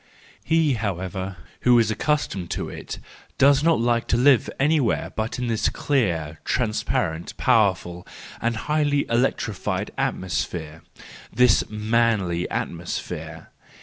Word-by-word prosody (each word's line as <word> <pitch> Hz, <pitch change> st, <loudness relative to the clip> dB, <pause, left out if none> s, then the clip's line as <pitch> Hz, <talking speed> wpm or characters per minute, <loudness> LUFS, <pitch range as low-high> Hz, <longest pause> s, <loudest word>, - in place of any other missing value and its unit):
He, 160 Hz, -3 st, +2 dB
however, 95 Hz, -3 st, -3 dB, 0.2 s
who 125 Hz, -1 st, +5 dB
is 115 Hz, -2 st, +3 dB
accustomed 110 Hz, -, -1 dB
to -, -, -3 dB
it, -, -, -7 dB, 0.4 s
does 140 Hz, +1 st, +5 dB
not 165 Hz, -6 st, +3 dB
like 120 Hz, 0 st, +1 dB
to 115 Hz, -, +2 dB
live 130 Hz, 0 st, +4 dB
anywhere 140 Hz, -4 st, +1 dB
but 110 Hz, +1 st, -2 dB
in 125 Hz, -, -2 dB
this 115 Hz, -2 st, +1 dB
clear, 85 Hz, -, -1 dB
transparent, 105 Hz, -8 st, -1 dB
powerful, 95 Hz, -5 st, +1 dB, 0.3 s
and 115 Hz, 0 st, 0 dB
highly 145 Hz, +3 st, +1 dB
electrified 115 Hz, -3 st, -1 dB
at¬ -, -, 0 dB
mosphere, 85 Hz, -3 st, -4 dB, 0.5 s
this 125 Hz, -3 st, +3 dB
manly 110 Hz, -5 st, +1 dB
atmosphere. 85 Hz, +1 st, -5 dB
115 Hz, 115 wpm, -24 LUFS, 95-130 Hz, 0.5 s, who